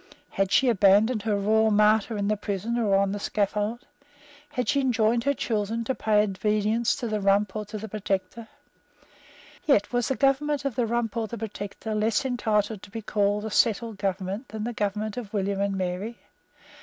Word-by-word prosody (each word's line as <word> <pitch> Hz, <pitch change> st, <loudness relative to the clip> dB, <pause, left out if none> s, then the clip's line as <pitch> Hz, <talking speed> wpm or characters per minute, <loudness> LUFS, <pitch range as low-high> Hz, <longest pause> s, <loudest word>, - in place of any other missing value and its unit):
Had 195 Hz, 0 st, 0 dB
she 270 Hz, -, +4 dB
abandoned 210 Hz, +1 st, +4 dB
her 210 Hz, 0 st, 0 dB
Royal 220 Hz, +2 st, +3 dB
Martyr 215 Hz, +1 st, +3 dB
in 200 Hz, 0 st, -1 dB
the 215 Hz, -, +2 dB
prison 205 Hz, +2 st, -3 dB
or 205 Hz, -4 st, +2 dB
on 195 Hz, 0 st, +2 dB
the 205 Hz, -, -3 dB
scaffold? 210 Hz, +3 st, -1 dB, 0.6 s
Had 250 Hz, -, -3 dB
she 280 Hz, -, +2 dB
enjoined 235 Hz, -2 st, +2 dB
her 280 Hz, -, +3 dB
children 225 Hz, 0 st, -1 dB
to 265 Hz, -, -1 dB
pay 210 Hz, -4 st, +2 dB
obedience 210 Hz, +3 st, 0 dB
to 240 Hz, -, -4 dB
the 215 Hz, -1 st, -2 dB
Rump 200 Hz, +1 st, +2 dB
or 215 Hz, 0 st, -3 dB
to 215 Hz, +1 st, -7 dB
the 220 Hz, +1 st, -6 dB
Protector? 200 Hz, +1 st, -3 dB, 1.2 s
Yet 245 Hz, -7 st, +2 dB
was 245 Hz, -1 st, +1 dB
the 265 Hz, -, 0 dB
government 285 Hz, +2 st, +1 dB
of 275 Hz, -, 0 dB
the 235 Hz, 0 st, 0 dB
Rump 235 Hz, -1 st, -1 dB
or 225 Hz, -, 0 dB
of -, -, -10 dB
the 235 Hz, -, -5 dB
Protector 215 Hz, 0 st, -5 dB
less 220 Hz, +5 st, +1 dB
entitled 215 Hz, -5 st, 0 dB
to -, -, -12 dB
be 225 Hz, +2 st, -7 dB
called 205 Hz, 0 st, 0 dB
a 220 Hz, -, -4 dB
settled 225 Hz, -1 st, +1 dB
government 195 Hz, +4 st, -3 dB
than 215 Hz, -1 st, -5 dB
the 240 Hz, +2 st, -3 dB
government 210 Hz, 0 st, -2 dB
of 225 Hz, -5 st, -6 dB
William 200 Hz, -1 st, -1 dB
and 200 Hz, -1 st, 0 dB
Mary? 190 Hz, +5 st, -3 dB
215 Hz, 195 wpm, -26 LUFS, 200-230 Hz, 1.2 s, she